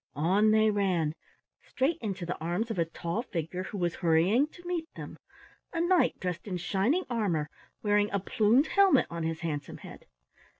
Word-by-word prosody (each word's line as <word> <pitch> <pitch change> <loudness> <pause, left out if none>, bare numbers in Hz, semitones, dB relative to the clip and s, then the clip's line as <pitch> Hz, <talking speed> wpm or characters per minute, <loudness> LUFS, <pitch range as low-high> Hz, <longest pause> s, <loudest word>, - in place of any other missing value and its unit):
On 190 +8 +3
they 215 0 +4
ran 185 -7 0 0.5
straight 285 +5 -1
into 195 -5 -4
the 175 - -3
arms 175 +8 -2
of 190 - -3
a 165 - +2
tall 170 +5 -4
figure 180 -6 -4
who 205 - -6
was 175 -3 0
hurrying 180 - +3
to 350 +3 -17
meet 340 -2 -3
them, - - -9 0.5
a 335 - -2
knight 345 +1 +2
dressed 180 +1 -4
in 185 -3 -2
shining 215 - 0
armor 185 -11 -1 0.3
wearing 205 0 +2
a 200 - -1
plumed 225 +6 +3
helmet 390 -6 +4
on 170 0 -4
his 160 0 -3
handsome 150 -4 -4
head. - - -12
200 Hz, 175 wpm, -29 LUFS, 170-240 Hz, 0.5 s, they